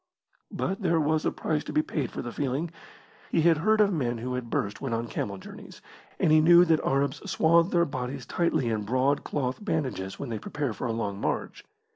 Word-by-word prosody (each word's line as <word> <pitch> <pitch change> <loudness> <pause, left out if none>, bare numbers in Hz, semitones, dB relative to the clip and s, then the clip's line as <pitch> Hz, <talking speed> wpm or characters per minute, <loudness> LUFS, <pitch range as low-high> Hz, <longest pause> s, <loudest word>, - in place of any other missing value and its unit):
But 195 +3 -3
there 170 -3 +2
was 155 +1 +1
a - - +1
price 150 -2 -2
to - - -5
be 155 - +3
paid 140 -6 -3
for - - -6
the 120 - -5
feeling. 145 +6 -2 0.6
He 165 - +2
had 165 0 +4
heard 215 +6 +3
of 205 -2 +4
men 120 -7 -1
who 125 +3 -4
had 125 -2 -4
burst 115 -8 -2
when 135 -4 -2
on 115 +1 -3
camel 100 -3 -3
journeys, - - -11 0.4
and - - +3
he 155 0 +6
knew 175 +2 +7
that 160 -2 +3
the - - -1
Arabs 140 +1 0
swathe 170 +2 +4
their 170 -2 +3
bodies 130 -3 -5
tightly 160 -8 0
in 110 -2 -1
broad 130 +6 +1
cloth 130 +4 -3
bandages 130 - -2
when 140 - -5
they 110 -2 -3
prepare 140 +1 -3
for 125 - -4
a - - -1
long 100 -3 -3
march. - - -3
140 Hz, 220 wpm, -27 LUFS, 120-160 Hz, 0.6 s, knew